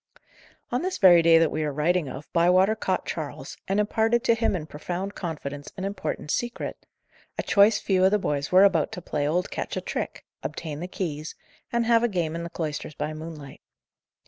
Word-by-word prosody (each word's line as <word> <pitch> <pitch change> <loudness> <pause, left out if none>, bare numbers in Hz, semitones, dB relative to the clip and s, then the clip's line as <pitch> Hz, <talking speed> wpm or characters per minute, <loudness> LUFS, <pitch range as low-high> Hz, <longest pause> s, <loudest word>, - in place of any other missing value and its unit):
On 245 +2 0
this 370 +1 -2
very 175 -3 +7
day 165 0 +6
that 165 -1 +3
we 155 - -1
are 150 - -1
writing 155 +2 +1
of, 135 +3 -8
Bywater 180 +5 +4
caught 190 -3 -1
Charles, 145 -4 -5
and 195 +2 +1
imparted 225 +3 +2
to 230 - +4
him 225 -3 +1
in 160 -4 -4
profound 175 +6 -5
confidence 145 -6 -6
an 190 - -3
important 195 -6 -4
secret; 240 0 -3 0.5
a - - -1
choice 205 +2 +5
few 185 -2 +1
of 190 - +6
the 210 - +3
boys 145 -7 -2
were 185 +2 +7
about 180 -6 +3
to 180 - -6
play 145 -3 -1
old 180 +5 0
Ketch - - -4
a - - -1
trick, - - -4 0.2
obtain 150 -3 -5
the 175 - -4
keys, 155 -5 -4 0.4
and 235 -1 +1
have 230 0 +4
a 240 - +3
game 175 -7 -1
in 170 - -3
the 170 - -5
cloisters 155 -2 -4
by 155 - -3
moonlight. 155 -3 -9
175 Hz, 200 wpm, -26 LUFS, 155-200 Hz, 0.5 s, very